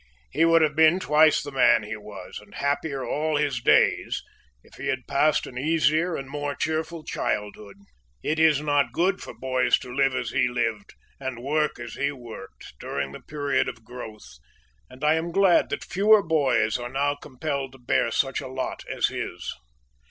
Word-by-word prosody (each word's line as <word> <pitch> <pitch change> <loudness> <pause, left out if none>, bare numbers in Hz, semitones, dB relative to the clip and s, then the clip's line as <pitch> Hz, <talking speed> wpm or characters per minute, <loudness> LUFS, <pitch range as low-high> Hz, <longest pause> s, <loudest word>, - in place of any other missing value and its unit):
He 155 +5 +3
would 165 -1 +5
have 150 -1 +1
been 160 +3 +5
twice 155 -1 +4
the 145 - -7
man 130 -4 +4
he 105 +1 -5
was, 105 -3 -9
and 105 -1 -16
happier 140 -1 -1
all 155 +1 0
his 145 -4 0
days, - - +3 0.4
if - - -22
he - - -5
had 130 -2 -2
passed 145 +2 +2
an 125 - -7
easier 160 +3 +2
and 135 - -5
a - - -13
more 145 -1 -3
cheerful 160 +2 -2
childhood. 105 -4 -3 0.5
It 155 +1 0
is 155 -3 +4
not 145 -1 +1
good 190 +3 +1
for - - -9
boys 130 -1 +2
to 125 - -9
live 135 0 +2
as 125 -1 -2
he - - +2
lived, 115 -4 -2 0.2
and 130 -3 -4
work 150 +2 0
as 120 -1 -7
he 140 +1 -1
worked, 120 - -11
during 70 -1 -3
the - - -10
period 145 -2 -1
of 115 -1 -11
growth, 110 - -10 0.5
and 130 +3 -13
I 150 +1 +5
am 165 +1 -1
glad 195 -1 +4
that - - -3
fewer 210 +2 +4
boys 135 -8 +2
are 120 0 -5
now 140 +2 0
compelled 140 -1 -5
to - - -13
bear 120 -1 +1
such 135 +3 0
a - - -7
lot 130 0 -4
as - - +1
his. - - -5
140 Hz, 190 wpm, -25 LUFS, 125-155 Hz, 0.5 s, would